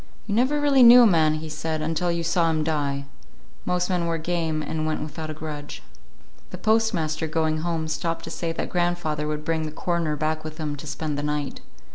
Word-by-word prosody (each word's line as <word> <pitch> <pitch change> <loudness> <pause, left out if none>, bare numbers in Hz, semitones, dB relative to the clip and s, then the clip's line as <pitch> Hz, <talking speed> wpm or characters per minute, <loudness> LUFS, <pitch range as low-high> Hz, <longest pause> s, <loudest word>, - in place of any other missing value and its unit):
You 210 - -3
never 260 +7 +2
really 285 -2 +4
knew 245 +1 +10
a - - +7
man, 160 -6 +4
he 155 +1 -5
said, 155 +1 -3
until 165 +3 0
you 170 0 -1
saw 170 0 +2
him 155 -1 0
die. 145 -3 -1 0.6
Most 180 0 0
men 180 -3 0
were 165 0 0
game, 160 -2 -1
and 155 0 -2
went 155 - -1
without 155 +1 -6
a - - -3
grudge. 150 -1 -7 0.7
The - - -7
postmaster, 180 -8 +1
going 155 0 0
home, 165 -1 -2
stopped 165 +1 -2
to 165 - -7
say 165 -1 -2
that 165 - -4
grandfather 175 -4 0
would 150 0 -3
bring 165 -1 0
the - - -6
coroner 170 -1 -1
back 155 +1 -1
with 155 0 -7
him 150 -2 -3
to 150 - -9
spend 150 0 -3
the - - -1
night. 150 -1 -3
160 Hz, 210 wpm, -24 LUFS, 155-175 Hz, 0.7 s, knew